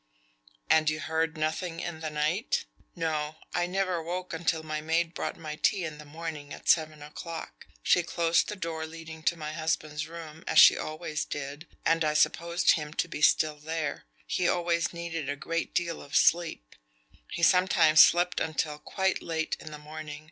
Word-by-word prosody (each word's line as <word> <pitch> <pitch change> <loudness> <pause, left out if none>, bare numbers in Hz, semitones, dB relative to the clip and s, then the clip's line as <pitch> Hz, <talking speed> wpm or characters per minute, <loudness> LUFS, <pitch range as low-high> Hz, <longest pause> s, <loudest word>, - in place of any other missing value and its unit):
"And 155 -1 +4
you 155 0 -2
heard 160 +1 -1
nothing 160 +2 -2
in 170 -2 -5
the 160 -1 -3
night?" 155 +7 0 0.3
"No; 155 -1 -2 0.2
I 175 0 +1
never 185 -2 0
woke 180 +2 -4
until 165 -1 -1
my 155 -1 -3
maid 165 +2 0
brought - - -4
my 155 -2 -6
tea 195 +2 +2
in 155 -2 -6
the 150 - -10
morning 150 -1 -7
at - - -9
seven 155 -2 +2
o'clock. 150 - -8 0.2
She 175 - +4
closed 170 0 +1
the 210 - -4
door 165 -4 -4
leading 160 0 -9
to 170 +1 +1
my 155 -1 -5
husband's 155 -1 -2
room, 160 -1 -9
as - - 0
she - - +10
always 155 -1 -3
did, 145 +3 -6 0.2
and 165 0 +3
I 150 0 +1
supposed 170 +3 +3
him 150 -1 -2
to - - 0
be 165 - -6
still 155 0 +4
there. 155 -1 -3 0.2
He 180 - 0
always 170 -1 +1
needed 170 -4 -4
a 145 - -1
great 165 +3 -3
deal 170 -1 -1
of 140 - -8
sleep. 165 - +2 0.5
He 170 - -5
sometimes 170 -4 +6
slept 175 +1 +5
until 155 -1 -2
quite 190 +4 -1
late 160 -1 -2
in - - -9
the 150 - -8
morning. 150 0 -8
160 Hz, 180 wpm, -29 LUFS, 155-170 Hz, 0.5 s, she